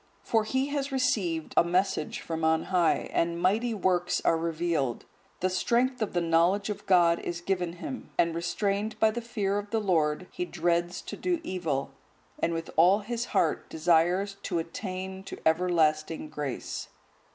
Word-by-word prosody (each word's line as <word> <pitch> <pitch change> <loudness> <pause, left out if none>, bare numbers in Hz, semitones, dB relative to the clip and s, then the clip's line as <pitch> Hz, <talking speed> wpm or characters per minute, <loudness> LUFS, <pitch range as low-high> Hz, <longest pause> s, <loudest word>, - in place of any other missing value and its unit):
For 225 -2 +1
he 260 +5 0
has 285 -1 -2
received 205 -12 0
a - - +6
message 180 -2 0
from 160 -1 -4
on 160 0 +3
high 175 -3 +2
and 170 0 +1
mighty 220 +6 +1
works 180 -3 +1
are - - +4
revealed; 165 -6 -1 0.4
the 185 - +2
strength 245 +6 +1
of 215 - -1
the 175 - +1
knowledge 170 +5 +2
of 210 - -8
God 175 -3 +5
is 175 0 -4
given 180 -1 -1
him, 255 - -7
and 170 -1 +3
restrained 200 +5 -1
by 220 0 +4
the 240 +2 -4
fear 205 -4 -1
of 205 0 -8
the 225 - 0
Lord, 165 -5 +1
he - - -3
dreads 175 0 -1
to - - -6
do 360 -2 -1
evil, 155 - -2 0.5
and 170 - +1
with 165 0 -4
all 185 +6 +6
his 235 +3 -3
heart 160 - 0
desires 175 +5 +2
to 175 - -2
attain 190 +2 -5
to - - -7
everlasting 160 -2 +2
grace." 145 -4 -4
180 Hz, 165 wpm, -28 LUFS, 165-205 Hz, 0.5 s, a